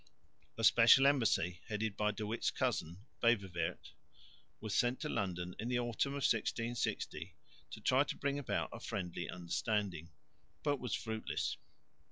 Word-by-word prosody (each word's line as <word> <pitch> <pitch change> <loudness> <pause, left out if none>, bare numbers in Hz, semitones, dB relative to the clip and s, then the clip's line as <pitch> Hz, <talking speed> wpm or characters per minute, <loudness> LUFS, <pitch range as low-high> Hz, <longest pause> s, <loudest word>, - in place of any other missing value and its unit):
A 115 - -3
special 120 +4 +7
embassy, 115 - +3
headed 110 -1 -2
by 105 0 +1
De 105 +1 -3
Witt's 110 +3 0
cousin, 90 +7 -2 0.2
Beverweert, 100 -7 0 0.7
was 110 -2 -4
sent 125 0 +2
to 150 - -2
London 90 -5 -2
in 115 - -3
the 125 0 +1
autumn 120 +3 0
of 140 -1 -3
1660 115 -7 -1 0.3
to - - -9
try 130 +2 +4
to - - -4
bring 140 0 -1
about 140 - -1
a - - -7
friendly 90 0 -4
understanding, 90 -1 -2 0.5
but 145 -2 +1
was 125 - -2
fruitless. 110 -1 -3
110 Hz, 145 wpm, -35 LUFS, 95-120 Hz, 0.7 s, special